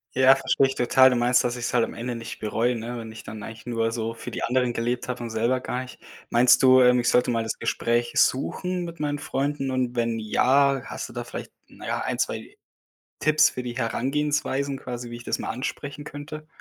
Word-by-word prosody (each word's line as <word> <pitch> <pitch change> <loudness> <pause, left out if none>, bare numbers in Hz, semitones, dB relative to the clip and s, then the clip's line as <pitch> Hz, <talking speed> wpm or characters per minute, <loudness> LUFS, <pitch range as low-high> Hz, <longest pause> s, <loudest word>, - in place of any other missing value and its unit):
Ja, 130 +1 +7
verstehe 135 0 +2
ich 135 - -4
total. 130 +2 +5
Du 125 - +1
meinst, 120 +1 +3
dass 120 0 -1
ich's 120 0 -3
halt 120 - +4
am - - -4
Ende 120 +1 -4
nicht 115 0 -7
bereue, 115 +3 0
ne, 120 +1 -5
wenn 110 -1 -8
ich 110 - -10
dann 110 - -8
eigentlich 110 +2 -9
nur 115 -2 0
so 115 -1 -3
für 115 - -8
die - - -5
anderen 125 0 +1
gelebt 120 +1 -2
habe 125 -1 -4
und 115 - -5
selber 115 +3 +1
gar 125 0 -3
nicht. 130 0 -10 0.3
Meinst 120 +1 +5
du, 130 0 +7
ähm, 125 0 +5
ich 120 - +2
sollte 125 0 +3
mal 115 -1 0
das 110 0 -3
Gespräch 120 0 0
suchen 180 +7 +1
mit 170 -1 -9
meinen 145 -1 -1
Freunden 140 -1 -2
und 125 -1 -1
wenn 115 -1 0
ja, 135 +5 +3
hast - - -6
du - - -12
da - - -4
vielleicht, - - -8 0.2
na - - -11
ja, - - -1
1, - - -3
2 - - -3 0.6
Tipps 155 0 +4
für 125 - -6
die 120 -1 -5
Herangehensweisen 140 +3 -1
quasi, 120 -2 -6
wie 120 - -6
ich 120 - -11
das - - -2
mal - - -4
ansprechen 140 +3 -5
könnte? 155 +1 -8
125 Hz, 230 wpm, -25 LUFS, 120-135 Hz, 0.6 s, Ja